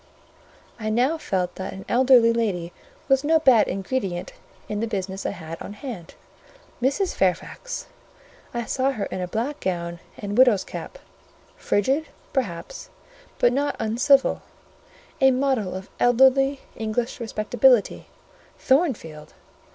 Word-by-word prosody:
I 215 -1 -2
now 255 +9 +1
felt 185 - -2
that - - -5
an 190 - -9
elderly 245 -2 +5
lady 185 -7 -2 0.3
was 270 -1 +3
no 320 +2 +4
bad 260 -8 +5
ingredient 190 -2 -3 0.3
in 210 - -3
the 230 - -1
business 195 -2 -3
I - - 0
had 165 -4 -8
on - - -7
hand. 210 - -8 0.7
Mrs. 280 +9 +1
Fairfax! 195 - -2 0.7
I 235 -1 -3
saw 260 +4 0
her 210 -5 -3
in 185 - -3
a 180 - -2
black 235 +10 -3
gown 170 -2 -3 0.2
and 205 0 -5
widow's 240 -6 +5
cap; - - -8 0.6
frigid, 270 +10 0 0.3
perhaps, 265 - -4 0.5
but 245 - +3
not 285 +2 0
uncivil: 245 +5 +3 0.8
a 265 - +7
model 255 -8 0
of 190 +1 -7
elderly 265 +3 +4
English 225 +3 -2
respectability. 235 +1 +2 0.5
Thornfield! 250 - 0
230 Hz, 130 wpm, -24 LUFS, 195-265 Hz, 0.8 s, a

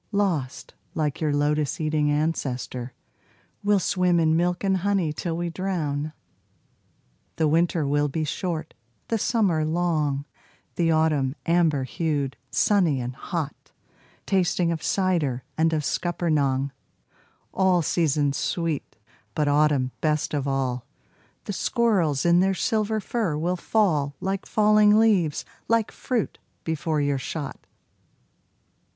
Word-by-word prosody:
Lost, 180 - -1 0.2
like 150 -2 -1
your 155 -2 +1
lotus 145 0 0
eating 155 -1 +1
ancestor, 130 -5 -2 0.7
We'll 205 0 +4
swim 180 -2 +2
in 160 -1 +3
milk 175 +2 0
and 190 -1 +2
honey 185 -4 0
till 165 +1 -3
we 170 0 -2
drown. 155 -5 -2 1.2
The 160 - +2
winter 165 0 +2
will 145 +1 +2
be 155 +3 -2
short, 165 0 -3 0.4
the 225 - +1
summer 195 -9 +2
long, 155 -4 0 0.5
The 170 -1 +1
autumn 155 -4 +2
amber 165 -5 +2
hued, 145 -1 -2
sunny 180 -10 +2
and 125 0 -4
hot, 160 -1 -5 0.5
Tasting 180 -3 +1
of 160 -2 -3
cider 165 -12 0
and 160 +1 +2
of 155 -2 0
scuppernong; 145 -5 0 0.8
All 185 -2 +3
seasons 150 -3 +1
sweet, 165 -4 -2 0.4
but 150 -1 +1
autumn 145 -3 +2
best 155 -1 0
of 140 -2 -1
all. 130 -3 -1 0.6
The 205 - -4
squirrels 185 - +1
in 170 0 +5
their 190 +1 +2
silver 215 +4 0
fur 210 -7 -1
will 175 +4 0
fall 165 -8 +1
Like 195 0 -3
falling 210 0 +5
leaves, 200 -9 +2 0.2
like 230 -2 +2
fruit, 245 -5 -2 0.2
before 160 -1 -1
your 140 -1 0
shot. 145 +2 -6
160 Hz, 125 wpm, -25 LUFS, 145-185 Hz, 1.2 s, in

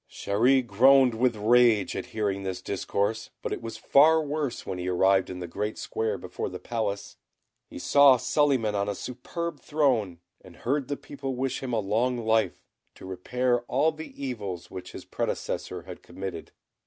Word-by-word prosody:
Chéri 125 +6 +2
groaned 130 +4 +5
with 120 +1 +1
rage 110 -1 +4
at - - -4
hearing 100 -3 -2
this 95 -2 -4
discourse; 100 +3 -2
but - - -2
it - - -5
was 115 -1 -6
far 160 +3 +5
worse 150 -4 -3
when 95 -2 -4
he 90 - -4
arrived 95 +1 +3
in 90 - -6
the 90 - -5
Great 105 +5 -3
Square 110 0 -2
before - - -5
the - - -6
Palace. 105 -4 -4 0.5
He - - -10
saw 140 -2 +6
Suliman 130 -6 +1
on 100 0 0
a 100 - -2
superb 150 - -5
throne, 125 - +1 0.3
and 90 -2 -14
heard 135 +5 -1
the 145 - -3
people 135 -2 -6
wish 130 +1 -2
him 130 -2 -4
a 115 - +1
long 115 +5 0
life, 110 -1 +1 0.3
to - - -12
repair 120 +7 0
all 145 +5 +2
the 160 0 -9 0.2
evils 100 -9 -5
which 90 -1 -8
his - - -9
predecessor 90 -2 -3
had 90 -1 -10
committed. 90 -2 -7
115 Hz, 175 wpm, -27 LUFS, 100-130 Hz, 0.5 s, saw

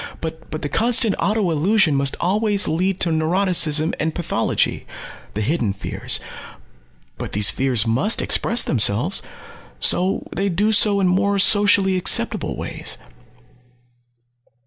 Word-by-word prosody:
But 160 0 -7
the - - -1
constant 230 - +2
auto 210 -3 0
illusion 175 +2 +2
must 140 -1 +1
always 205 +2 0
lead 185 +4 -1
to 170 - +2
neuroticism 160 -1 +1
and 160 +1 -2
pathology 175 - -2 0.5
the 105 - -2
hidden 115 -4 -1
fears. 100 - -3 1.0
But - - -6
these 105 0 +4
fears 125 -4 +1
must 130 - 0
express 235 +2 +1
themselves. 120 - 0 0.6
So 185 +2 +1
they 195 +1 -1
do 205 +5 0
so 205 -1 +3
in 190 - +2
more 200 +2 +1
socially 200 -1 +3
acceptable 180 - 0
ways." - - -5
180 Hz, 125 wpm, -20 LUFS, 150-200 Hz, 1.0 s, these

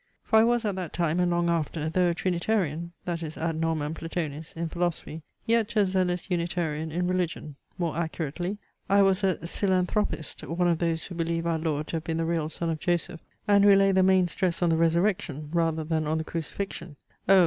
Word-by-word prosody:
For 220 - +4
I - - +6
was 240 0 +2
at 205 -2 0
that 180 -4 -4
time 170 0 0
and 180 -1 +3
long 175 0 +1
after, 160 -2 -1
though 175 +2 +2
a 170 - 0
Trinitarian 170 -2 -1
(that 170 -1 -2
is 155 -1 -6
ad 165 0 -2
normam 160 -2 0
Platonis) 160 -2 -4
in 170 0 -1
philosophy, 170 -2 -2 0.2
yet 230 0 +1
a 210 -2 +5
zealous 185 -2 0
Unitarian 165 -3 -1
in 180 +3 0
religion; 175 -5 -2 0.2
more 170 -4 -1
accurately, 170 +3 -3 0.3
I 200 0 +6
was 195 +1 +2
a 190 -2 +3
Psilanthropist, 185 -2 -1
one 175 +2 +1
of 170 -2 +2
those 165 -1 0
who 180 - -8
believe 165 0 -1
our 165 -1 +1
Lord 155 -2 -1
to 165 - -1
have 160 - -5
been 165 -1 -1
the 165 - 0
real 165 -2 0
son 165 +1 -2
of 160 - -3
Joseph, 170 0 -1 0.3
and 200 -1 +5
who 200 -1 +8
lay 195 0 +5
the 190 0 +4
main 185 -1 +4
stress 175 +2 -1
on 175 - +3
the 165 - +3
resurrection 165 -3 +1
rather 165 -2 +1
than 155 -1 -1
on 155 +1 +1
the 160 - -1
crucifixion. 170 0 -5 0.3
O! 195 -1 +8
170 Hz, 210 wpm, -27 LUFS, 160-185 Hz, 0.3 s, who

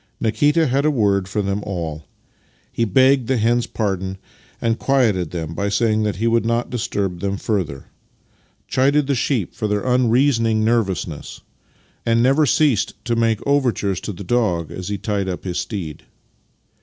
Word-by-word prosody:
Nikita 145 +8 +2
had 135 +1 +1
a 155 - +3
word 100 -8 +1
for 100 +2 -2
them 100 +1 -1
all. 80 -6 -5 0.7
He 115 - 0
begged 130 +3 +3
the 130 - +1
hens' 120 +2 +1
pardon, 95 -3 -2 0.4
and 115 0 0
quieted 110 - +2
them 80 -1 -5
by 100 +4 -1
saying 110 +1 +1
that 105 -1 0
he 110 - -2
would 115 0 +3
not 115 +1 -1
disturb 100 -7 -2
them 100 +2 -2
further; 95 -11 -2 0.8
chided 140 +3 +2
the 140 - 0
sheep 125 - -1
for 110 -3 -3
their 105 +2 -1
unreasoning 120 -3 +2
nervousness; 100 -9 -1 0.6
and 115 0 +2
never 140 +4 +4
ceased 130 -5 +2
to 120 - 0
make 115 -2 +1
overtures 125 -9 +1
to - - -4
the 100 +1 -8
dog 90 -7 0
as 90 - -6
he 105 0 -2
tied 100 -2 -2
up 90 - -5
his 90 -2 -3
steed. 90 -5 -5
110 Hz, 165 wpm, -20 LUFS, 95-125 Hz, 0.8 s, never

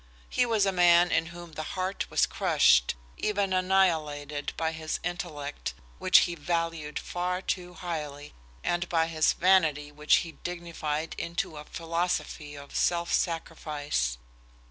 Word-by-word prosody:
He 245 - +2
was 220 -3 +3
a 195 - +2
man 175 -1 +5
in 165 - +2
whom 170 0 -10
the 155 - -5 0.2
heart 185 +1 -2
was - - +3
crushed, - - +3 0.2
even 200 -2 0
annihilated, 160 -6 +1
by 160 0 0
his 160 -1 -3
intellect, 150 - -4 0.2
which - - +6
he 175 - 0
valued 165 -1 -2
far 180 +1 -2
too 180 -2 -3
highly, 150 -4 -5 0.3
and 175 0 0
by 165 -1 +3
his 160 -1 +2
vanity, 160 -6 +3
which 150 +1 +3
he 165 - -7
dignified 165 -3 -4
into 170 -1 -3
a 150 0 -8
philosophy 165 -3 -2
of 140 0 -11
self 170 0 +1
sacrifice. 150 - -1
165 Hz, 140 wpm, -28 LUFS, 150-175 Hz, 0.3 s, which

